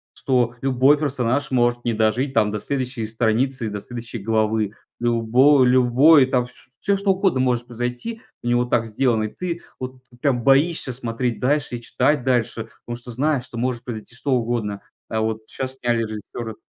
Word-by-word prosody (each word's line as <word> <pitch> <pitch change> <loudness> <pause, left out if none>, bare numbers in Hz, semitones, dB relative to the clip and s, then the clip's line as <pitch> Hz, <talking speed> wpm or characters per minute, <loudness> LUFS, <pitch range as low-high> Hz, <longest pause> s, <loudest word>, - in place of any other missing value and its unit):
что 125 -3 +1
любой 135 +2 +4
персонаж 140 0 0
может 120 -1 +1
не 120 - +1
дожить, 115 +5 +1
там, 105 -2 +3
до 105 - -3
следующей 125 -4 -3
страницы, 115 +2 0
до 105 - -4
следующей 115 +1 -7
главы. 110 0 0 0.3
Любо 120 +4 +4
любой 130 +3 +6
там, 125 -2 +1
вс 125 - -14 0.3
всё 200 - +1
что 200 0 -2
угодно 190 -7 +1
может 125 -2 +1
произойти, 125 - -4 0.2
у - - -4
него 120 0 +2
так 120 -2 +1
сделано, 115 0 +1
и - - -1
ты 175 -2 -4 0.2
вот 130 0 -7 0.2
прям 130 -5 +1
боишься 140 +2 +3
смотреть 120 0 -2
дальше 140 0 0
и - - -11
читать 130 +3 +1
дальше, 120 -3 0 0.2
потому 120 - -4
что 120 - -12
знаешь, 135 +2 0
что 120 - -10
может 125 0 -2
произойти 120 -2 -7
что 135 +2 -1
угодно. 115 -4 -1 0.3
А 110 - -1
вот 110 0 -3
щас 130 0 -5
сняли 120 -2 +1
режиссера. 110 +1 -6
120 Hz, 175 wpm, -22 LUFS, 115-135 Hz, 0.3 s, любой